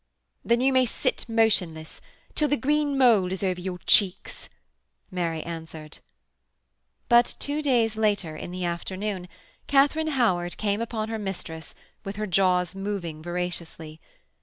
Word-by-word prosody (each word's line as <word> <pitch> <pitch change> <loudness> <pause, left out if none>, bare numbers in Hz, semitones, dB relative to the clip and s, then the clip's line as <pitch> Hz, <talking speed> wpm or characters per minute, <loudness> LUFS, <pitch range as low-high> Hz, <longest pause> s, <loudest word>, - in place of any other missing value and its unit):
'Then 235 +1 +2
you 265 +1 +3
may 260 0 +5
sit 250 0 -1
motionless 190 -9 +1 0.3
till 300 - +1
the 290 +1 +1
green 290 +2 +1
mould 225 -8 +5
is 190 +1 -3
over 185 -2 -1
your 180 0 -4
cheeks,' 195 -3 +2 0.6
Mary 170 -3 -2
answered. 160 -2 -8 1.1
But 240 0 +5
two 290 +1 -1
days 235 -6 +2
later, 205 -7 0
in 155 - -7
the 180 0 -4
afternoon, 185 +2 -3 0.4
Katharine 290 +3 +3
Howard 175 -8 +1
came 205 0 0
upon 225 -1 -3
her 225 -1 -3
mistress 175 -5 -6 0.3
with 195 -1 -5
her 215 +1 -2
jaws 180 -2 +2
moving 195 -5 -4
voraciously. 170 -2 -5
195 Hz, 135 wpm, -26 LUFS, 175-235 Hz, 1.1 s, may